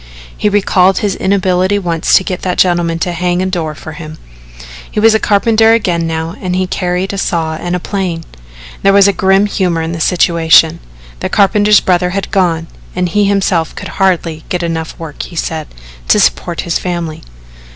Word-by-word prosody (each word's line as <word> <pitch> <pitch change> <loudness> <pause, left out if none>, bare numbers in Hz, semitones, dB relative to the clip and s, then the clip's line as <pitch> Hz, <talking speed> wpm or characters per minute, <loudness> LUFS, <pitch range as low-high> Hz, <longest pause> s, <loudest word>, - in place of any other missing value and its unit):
He 210 - 0
recalled 190 -2 +2
his 205 -2 0
inability 190 0 +1
once 170 -4 0
to - - +4
get 185 -1 -4
that 180 -1 -2
gentleman 175 -2 +2
to 175 +2 -2
hang 175 +1 -1
a 185 - 0
door 170 -5 -3
for 155 - -9
him. 155 0 -9 0.7
He - - -3
was 225 +1 +5
a 220 - +2
carpenter 220 +2 +3
again 175 -7 0
now 160 +1 -3
and 180 -1 -2
he 185 0 0
carried 180 +1 -2
a 200 - -3
saw 165 -4 -1
and 175 +3 -3
a - - -2
plane. 180 -3 -3 0.6
There 195 - +3
was 200 0 +6
grim 195 0 +2
humour 180 -5 -1
in 160 - -3
the 165 -1 -5
situation. 165 -1 +3 0.4
The - - -3
carpenter's 205 +1 +4
brother 180 -1 +1
had 195 - -4
gone 175 -5 +1 0.3
and 180 0 -1
he 205 +4 +1
himself 190 -5 0
could - - -7
hardly 170 -4 0
get 180 -1 -2
enough 160 -1 -4
work, 160 -3 -7
he - - -9
said, 160 -1 -3 0.4
to - - +4
support - - 0
his 170 - -2
family. 170 -3 -4
180 Hz, 185 wpm, -13 LUFS, 165-195 Hz, 0.7 s, was